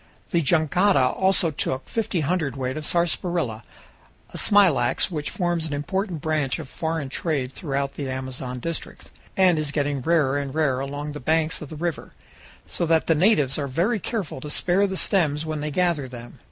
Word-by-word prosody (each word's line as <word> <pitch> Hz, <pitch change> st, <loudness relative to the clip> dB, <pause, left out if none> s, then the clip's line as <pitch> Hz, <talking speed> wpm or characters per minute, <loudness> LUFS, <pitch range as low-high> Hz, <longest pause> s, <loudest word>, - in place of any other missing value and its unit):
The 170 Hz, -3 st, +3 dB
jangada 160 Hz, -1 st, +3 dB
also 190 Hz, -3 st, +2 dB
took 130 Hz, -2 st, -2 dB
fifty 215 Hz, -6 st, -1 dB
hundredweight 140 Hz, -5 st, -1 dB
of 155 Hz, -1 st, -3 dB
sarsaparilla, 170 Hz, -8 st, 0 dB, 0.7 s
a -, -, -9 dB
smilax 185 Hz, -, +3 dB
which 150 Hz, -3 st, -3 dB
forms 175 Hz, -3 st, -1 dB
an 150 Hz, -, -4 dB
important 175 Hz, +3 st, -2 dB
branch 155 Hz, -4 st, 0 dB
of 160 Hz, -4 st, -7 dB
foreign 160 Hz, 0 st, -3 dB
trade 135 Hz, -2 st, -2 dB
throughout 140 Hz, -2 st, -2 dB
the 140 Hz, -2 st, -4 dB
Amazon 130 Hz, -1 st, -5 dB
districts, 165 Hz, +6 st, -5 dB, 0.3 s
and 180 Hz, -4 st, +5 dB
is 150 Hz, -2 st, -2 dB
getting 145 Hz, -1 st, -1 dB
rarer 145 Hz, -2 st, +2 dB
and 140 Hz, -1 st, -5 dB
rarer 145 Hz, -5 st, +2 dB
along 145 Hz, +2 st, -4 dB
the 150 Hz, -, -6 dB
banks 160 Hz, +3 st, +1 dB
of 150 Hz, -, -7 dB
the 155 Hz, -, -7 dB
river, 165 Hz, 0 st, -4 dB, 0.5 s
so 170 Hz, -, -2 dB
that 160 Hz, 0 st, +3 dB
the 165 Hz, -, +4 dB
natives 155 Hz, -, +3 dB
are 140 Hz, -, -2 dB
very 180 Hz, -, +1 dB
careful 195 Hz, -, -4 dB
to 150 Hz, -, -6 dB
spare 180 Hz, +6 st, +2 dB
the 190 Hz, -1 st, -3 dB
stems 155 Hz, -7 st, +2 dB
when 155 Hz, -1 st, -3 dB
they 150 Hz, +1 st, -2 dB
gather 170 Hz, -3 st, +1 dB
them. 120 Hz, -1 st, -10 dB
155 Hz, 180 wpm, -24 LUFS, 140-175 Hz, 0.7 s, and